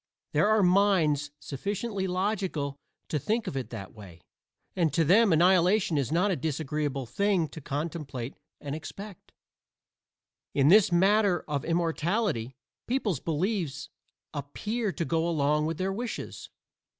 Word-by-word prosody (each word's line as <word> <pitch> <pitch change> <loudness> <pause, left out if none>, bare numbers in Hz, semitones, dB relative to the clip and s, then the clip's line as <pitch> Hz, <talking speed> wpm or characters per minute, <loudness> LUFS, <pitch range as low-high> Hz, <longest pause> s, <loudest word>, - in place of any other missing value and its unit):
There - - +3
are 215 -1 +4
minds 180 -6 +3
sufficiently 200 - -3
logical 185 -7 -1 0.3
to 150 - 0
think 220 - -1
of - - -4
it 130 -2 -3
that 100 -5 -8
way, 95 -6 -12 0.6
and 170 -5 +2
to 165 - +3
them 200 +6 +5
annihilation 180 +2 +4
is 140 -3 0
not 180 +5 +2
a - - +1
disagreeable 150 -2 -2
thing 185 - +1
to 160 - -9
contemplate 140 -4 -4 0.3
and 140 -1 -5
expect. 195 +5 -9 1.2
In 140 +1 +4
this 200 0 +6
matter 195 +1 +3
of 145 -3 -2
immortality, 165 - 0 0.3
people's 230 - 0
beliefs 165 - -2 0.4
appear 205 - -3
to 170 -2 -3
go 165 +1 0
along 150 -1 +1
with 165 -1 -3
their 190 +2 -1
wishes. 235 +3 -5
170 Hz, 135 wpm, -28 LUFS, 145-200 Hz, 1.2 s, this